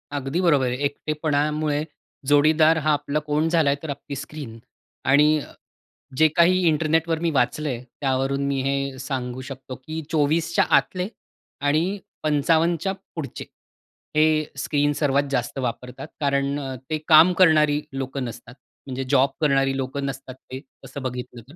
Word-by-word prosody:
अगदी 140 +5 -2
बरोबर 145 -7 +3
आहे. 125 - -1
एकटेपणामुळे 150 0 -1 0.4
जोडीदार 155 +2 +5
हा 155 - +4
आपला 145 +1 -1
कोण 150 +2 +2
झाला 160 -4 +3
आहे. 140 - +1
तर 155 - -6
आपली 140 0 -6
स्क्रीन 145 -4 -8 0.5
आणि 150 +3 +5
अ, - - -10 0.7
जे 155 - +6
काही 185 +2 +4
इंटरनेटवर 160 +1 +1
मी 170 -1 0
वाचलं 145 +3 0
आहे. 125 -1 -4 0.2
त्यावरून 135 +1 0
मी 135 -1 0
हे 140 0 -2
सांगू 130 -1 -4
शकतो, 130 -1 -8
की 155 +5 -6
24च्या 160 +1 +2
आतले 185 +1 -1 0.6
आणि 175 +7 +1 0.2
55च्या 165 +5 +2 0.2
पुढचे 155 -4 -6 0.7
हे 155 0 +4
स्क्रीन 145 +1 +1
सर्वात 140 -1 +1
जास्त 135 +1 -2
वापरतात, 125 +3 -5
कारण 140 0 0 0.3
ते 155 - 0
काम 165 +3 +8
करणारी 150 -3 +5
लोकं 135 0 -4
नसतात. 120 +1 -9 0.3
म्हणजे 135 0 -3
जॉब 140 -1 +4
करणारी 135 -2 +2
लोकं 135 +1 -3
नसतात 135 -1 -6 0.2
ते 130 +1 -6 0.2
असं 135 +1 -8
बघितलं 125 -1 -5
तर, 155 - -14
145 Hz, 145 wpm, -23 LUFS, 135-155 Hz, 0.7 s, काम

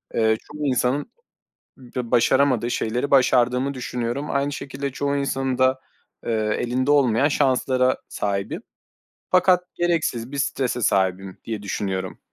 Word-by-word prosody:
Eee, 110 -1 +3
çoğu 150 0 -7
insanın 130 +2 0 0.7
b 125 -2 -6
başaramadığı 120 0 +3
şeyleri 125 +6 -1
başardığımı 125 0 +3
düşünüyorum. 125 +3 -3
Aynı 140 +1 0
şekilde, 140 0 -5
çoğu 140 +2 -1
insanın 135 -2 -1
da, 130 0 +3 0.5
eee, 115 - -1 0.3
elinde 130 +3 0
olmayan 135 -2 +4
şanslara 130 -2 +2
sahibim 100 -1 -3 0.7
fakat 185 0 +4
gereksiz 160 -8 -1
bir 140 - -4
strese 130 -2 -1
sahibim 95 -1 0
diye 110 -3 -4
düşünüyorum. 95 -2 -3
130 Hz, 120 wpm, -23 LUFS, 115-140 Hz, 0.7 s, olmayan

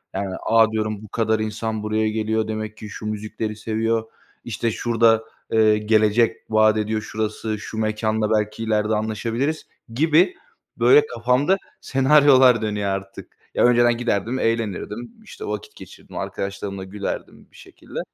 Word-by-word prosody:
Yani, 95 -1 -3
a, 115 0 +4
diyorum 110 -1 -2
bu - - -10
kadar 110 +1 0
insan 110 0 -3
buraya 110 0 0
geliyor 110 0 -1
demek 110 0 -5
ki 110 - -9
şu 105 - -8
müzikleri 110 0 -4
seviyor, 110 +1 -1 0.4
işte, 115 0 -2
şurada, 115 0 +2 0.3
eee, 110 -1 +4
gelecek 110 +1 +2
vaat 110 0 +4
ediyor 110 0 -1
şurası, 110 0 -3
şu 110 - -8
mekânla 110 0 0
belki 105 +1 0
ileride 110 -1 +1
anlaşabiliriz 115 +8 -2 0.3
gibi, 160 - +3 0.4
böyle, 440 +1 +6
kafamda 145 - +1 0.2
senaryolar 135 -3 +5
dönüyor 105 -2 -1
artık. 95 0 -6 0.2
Ya, - - +3
önceden 120 -1 +4
giderdim 120 +1 -1
eğlenirdim, 115 0 -2
işte, - - -9
vakit 105 -1 -6
geçirirdim, - - -12
arkadaşlarımla 100 0 -4
gülerdim 100 +2 -6
bir - - -23
şekilde - - -10
110 Hz, 140 wpm, -22 LUFS, 105-115 Hz, 0.4 s, böyle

